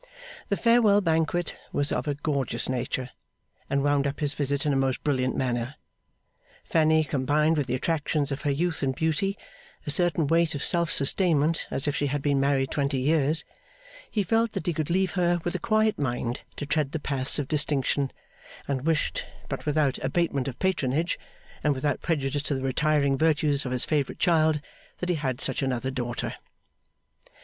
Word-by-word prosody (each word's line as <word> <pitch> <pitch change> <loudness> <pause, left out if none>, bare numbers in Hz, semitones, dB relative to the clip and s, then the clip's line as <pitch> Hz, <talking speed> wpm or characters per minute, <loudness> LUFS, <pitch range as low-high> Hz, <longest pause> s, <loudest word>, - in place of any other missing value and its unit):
The 200 - +1
farewell 230 -3 +5
banquet 165 -1 0 0.2
was 145 +1 0
of - - -1
a 145 - 0
gorgeous 140 -2 -1
nature, 130 0 -2 0.6
and 140 0 +1
wound 145 -1 +2
up 140 - -4
his 145 -1 +2
visit 140 0 -1
in 145 - +2
a - - +1
most 135 -1 0
brilliant 130 -3 0
manner. 125 +1 -1 0.9
Fanny 160 -1 +3
combined 150 +3 +1
with 145 -4 -1
the 125 - 0
attractions 150 0 -1
of 135 - -3
her 145 - -1
youth 165 +4 0
and 135 -2 0
beauty, 160 +7 0 0.5
a 145 - +1
certain 170 -1 +2
weight 165 +1 +2
of 140 - -3
self 170 -2 +3
sustainment 160 +1 +2
as 135 - -3
if 145 - 0
she 145 - 0
had 140 +1 -2
been 140 -2 +2
married 135 -1 +1
twenty 140 -1 0
years. 150 +3 +1 0.6
He 210 - 0
felt 225 +4 +1
that - - -4
he 175 - +1
could 155 -2 -2
leave 190 +2 +1
her 175 -2 +1
with 175 - -2
a - - -2
quiet 215 -3 +2
mind 125 -3 -2
to 145 - -5
tread 145 -1 0
the 160 - -1
paths 135 -2 0
of 145 -3 -1
distinction, 140 -2 +1 0.6
and 140 +1 -2
wished 160 -2 0 0.2
but - - -5
without 150 -3 +1
abatement 140 -1 0
of 130 - -5
patronage, 165 -3 0 0.4
and 150 -1 +2
without 130 +1 -1
prejudice 145 -3 -1
to 145 0 -1
the 130 - -3
retiring 140 0 +2
virtues 150 -3 +2
of - - -4
his 125 -1 0
favourite 145 -4 -1
child 160 -4 +3 0.4
that 180 - -3
he 175 - +2
had 130 -3 -2
such 135 -1 0
another 130 -1 -1
daughter. 120 -2 -3
145 Hz, 180 wpm, -26 LUFS, 135-160 Hz, 0.9 s, farewell